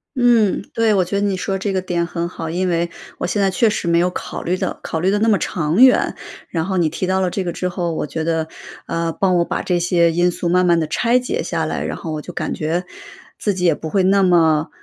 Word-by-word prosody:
嗯， 240 -5 +3
对。 225 -1 +3
我 190 -2 +3
觉 200 +3 -2
得 205 - 0
你 195 -2 0
说 195 +1 -2
这 195 0 -2
个 185 - 0
点 175 -2 -1
很 170 0 -3
好， 165 -2 -6
因 180 +2 0
为 170 0 0 0.3
我 - - -3
现 205 - -1
在 195 - +3
确 190 +5 +2
实 205 -4 -1
没 170 0 +3
有 180 +1 +2
考 - - -6
虑 180 - 0
得 - - -3
考 160 - -3
虑 185 +3 +1
得 205 - +2
那 220 +2 +1
么 210 -3 +3
长 165 +5 0
远， 260 - +4 0.3
然 165 -2 -1
后 190 0 -2
你 170 -3 +3
提 170 +4 -3
到 190 0 +1
了 185 -2 0
这 195 - -2
个 175 - -2
之 180 - -3
后， 175 -2 -2
我 - - -2
觉 160 +2 -4
得， 160 -1 -1 0.4
呃， 165 0 -2
帮 185 0 +1
我 170 - +3
把 - - -3
这 180 -1 0
些 170 -1 +3
因 175 +2 +2
素 175 0 -3
慢 180 +1 +3
慢 170 -1 +4
地 160 - 0
拆 235 +10 +2
解 315 - -2
下 - - -2
来， - - -3
然 - - -4
后 160 - -6
我 155 -1 -3
就 - - -9
感 - - -3
觉 165 +4 -2 0.5
自 205 -2 0
己 180 -1 -1
也 165 - +5
不 160 - -6
会 195 +3 +2
那 195 +1 +4
么， 160 -4 +3
180 Hz, 290 characters per minute, -19 LUFS, 170-195 Hz, 0.5 s, 也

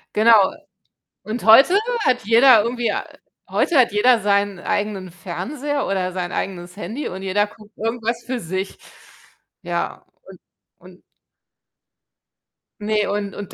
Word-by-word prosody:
Genau, 215 -3 +5 0.7
und 220 +4 -5
heute 265 - +7 0.3
hat 250 -1 +2
jeder 230 +1 +6
irgendwie 240 0 -1
ei - - -2 0.5
heute 335 - +1
hat 250 - +4
jeder 225 +3 +3
seinen 200 -2 0
eigenen 200 -3 -3
Fernseher 255 - -4
oder 185 -2 -1
sein 180 -1 -4
eigenes 180 -1 -5
Handy 215 +10 -5
und 190 +1 -7
jeder 205 +2 0
guckt 210 -1 -18
irgendwas 230 +1 -3
für 250 +1 -3
sich. 190 +1 -5 0.8
Ja, - - -4 0.2
und - - -15 0.4
und - - -17 1.8
Ne, 210 0 0
und 205 -1 -3
und 205 -2 -8
210 Hz, 130 wpm, -21 LUFS, 190-235 Hz, 1.8 s, heute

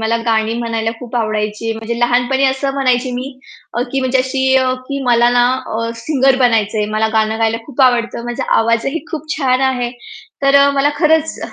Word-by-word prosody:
मला 225 +1 0
गाणी 220 0 +1
म्हणायला 225 -1 -2
खूप 245 0 -6
आवडायची. 215 0 -2
म्हणजे 230 +1 -4
लहानपणी 245 +3 +1
असं 265 +1 -1
म्हणायची 255 -2 +1
मी 260 +2 -5 0.5
अ, - - +2
की 270 - 0
म्हणजे 260 0 +1
अशी 260 +1 -1 0.4
की 275 -1 -3
मला 240 0 +4
ना 245 - +5 0.3
अ, 230 0 -2
सिंगर 270 -3 +2
बनायचंय. 215 -2 0
मला 220 0 +1
गाणं 220 0 0
गायला 225 0 +1
खूप 275 -1 -1
आवडत. 235 -2 -2
माझा 240 - -4
आवाजही 230 +7 -1
खूप 310 -2 -6
छान 260 -3 +1
आहे. 245 -1 -2 0.5
तर 275 0 +5
अ, - - +3
मला 285 +1 +3
खरंच 320 -1 +2
245 Hz, 175 wpm, -16 LUFS, 225-270 Hz, 0.5 s, ना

